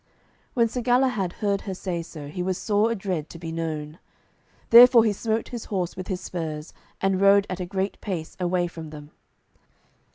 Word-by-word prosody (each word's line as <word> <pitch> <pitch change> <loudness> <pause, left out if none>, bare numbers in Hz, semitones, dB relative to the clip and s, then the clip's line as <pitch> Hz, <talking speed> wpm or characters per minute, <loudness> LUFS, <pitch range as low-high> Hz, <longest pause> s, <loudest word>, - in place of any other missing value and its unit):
When 235 -2 +4
Sir 245 +2 -4
Galahad 245 -6 +2
heard 200 -1 +1
her 190 -2 -5
say 180 -2 -3
so, 155 -3 -9
he 180 +5 -5
was 185 0 -1
sore 210 +2 +1
adread 190 -8 -3
to - - -10
be 165 -1 -6
known. 160 -1 -4 0.7
Therefore 240 0 +9
he 215 - +2
smote 220 +2 -2
his 240 -3 -6
horse 185 -4 -2
with 185 - -7
his 185 -3 -2
spurs, 155 -3 -5 0.3
and 195 -1 +1
rode 200 0 +6
at 185 - -4
a 180 - -4
great 195 +1 -3
pace 175 -6 -5
away 180 0 +1
from 165 -2 -8
them. 150 -1 -11
185 Hz, 185 wpm, -25 LUFS, 165-210 Hz, 0.7 s, Therefore